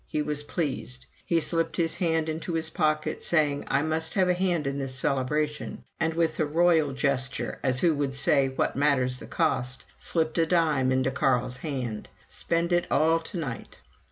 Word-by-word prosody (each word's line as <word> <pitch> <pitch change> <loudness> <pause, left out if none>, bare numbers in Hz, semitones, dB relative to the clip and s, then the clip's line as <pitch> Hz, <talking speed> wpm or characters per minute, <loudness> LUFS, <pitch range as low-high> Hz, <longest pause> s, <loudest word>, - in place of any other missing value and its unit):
He 150 - -1
was 150 -1 -2
pleased. 140 -5 -4 0.2
He 170 - +2
slipped 165 +1 -1
his 165 -1 0
hand 160 -3 +1
into 160 +2 -3
his 160 -1 -2
pocket 155 -3 0
saying, 150 -4 +1
"I 140 - +1
must 160 +1 -2
have 190 -2 +3
a - - +4
hand 175 -4 0
in 140 +1 -2
this 135 -1 -4
celebration." 150 +3 -1 0.2
And 160 -1 0
with 165 -1 0
a 155 - +3
royal 160 -1 +3
gesture, 135 -1 -1
as 130 -2 +1
who 165 -3 +3
should 135 -1 -1
say, 135 0 +3
"What 130 - -1
matter 140 -2 +3
the 125 0 -6
costs!" 135 -6 -1
slipped 160 0 -1
a 165 - +3
dime 155 -7 +2
into 130 0 +1
Carl's 125 -1 +1
hand. 125 -7 -4 0.2
"Spend 170 +1 -1
it 175 0 +2
all 160 +1 +3
to 165 +3 -7
night." 135 -8 -6
150 Hz, 185 wpm, -27 LUFS, 135-165 Hz, 0.2 s, a